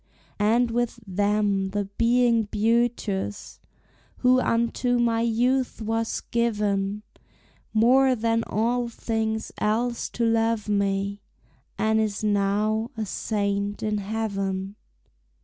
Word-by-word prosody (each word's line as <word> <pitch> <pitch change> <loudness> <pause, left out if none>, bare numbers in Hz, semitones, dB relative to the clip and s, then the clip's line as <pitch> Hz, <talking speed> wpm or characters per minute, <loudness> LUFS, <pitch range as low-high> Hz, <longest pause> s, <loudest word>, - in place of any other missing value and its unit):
And 230 +3 +3
with 240 0 -1
them 200 0 +1
the 205 +1 -2
being 230 +2 +2
beauteous 215 -2 -1 0.6
Who 255 0 +4
unto 235 +1 +1
my 230 -1 +2
youth 245 +3 +1
was 225 +1 -2
given, 210 -3 0 0.7
More 255 +4 +4
than 230 0 0
all 235 +2 0
things 220 -1 -2
else 235 +3 0
to 235 - +2
love 225 -1 +1
me, 200 0 0 0.6
And 220 0 +2
is 215 -1 -1
now 210 +2 +1
a 220 - -2
saint 200 0 -2
in 215 -1 0
heaven. 195 -2 -3
220 Hz, 105 wpm, -25 LUFS, 205-235 Hz, 0.7 s, Who